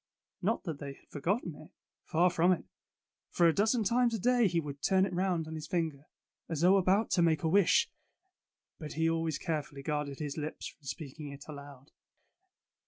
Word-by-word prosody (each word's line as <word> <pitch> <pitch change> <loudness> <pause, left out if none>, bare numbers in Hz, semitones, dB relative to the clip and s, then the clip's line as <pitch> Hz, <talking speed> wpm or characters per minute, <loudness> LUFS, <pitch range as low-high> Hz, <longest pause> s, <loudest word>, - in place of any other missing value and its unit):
Not 215 +5 0
that 160 -6 -5
they 140 -1 -6
had - - -23
forgotten 175 - -1
it. 155 - -13 0.4
Far 175 +3 +3
from 175 +2 +3
it; 175 - -5 0.6
for 170 - +4
a 165 - +4
dozen 220 +4 +2
times 235 +2 +2
a - - -3
day 245 +1 +4
he 170 -2 +1
would 145 -3 -6
turn 190 0 +3
it 190 - -5
around 175 -3 0
on 160 - -6
his 155 -1 -6
finger, 160 -5 -2 0.4
as 165 -2 -2
though 185 +3 +6
about 195 +3 +2
to 175 - +3
make 160 -2 +2
a - - +2
wish. 195 +2 +4 0.9
But 155 -3 -6
he 160 +2 +1
always 165 -2 0
carefully 150 -4 -4
guarded 150 -2 -2
his 145 -1 -4
lips 155 0 -5
from 150 - -21
speaking 145 0 -6
it 140 0 -11
aloud. 140 -2 -11
165 Hz, 190 wpm, -31 LUFS, 150-185 Hz, 0.9 s, though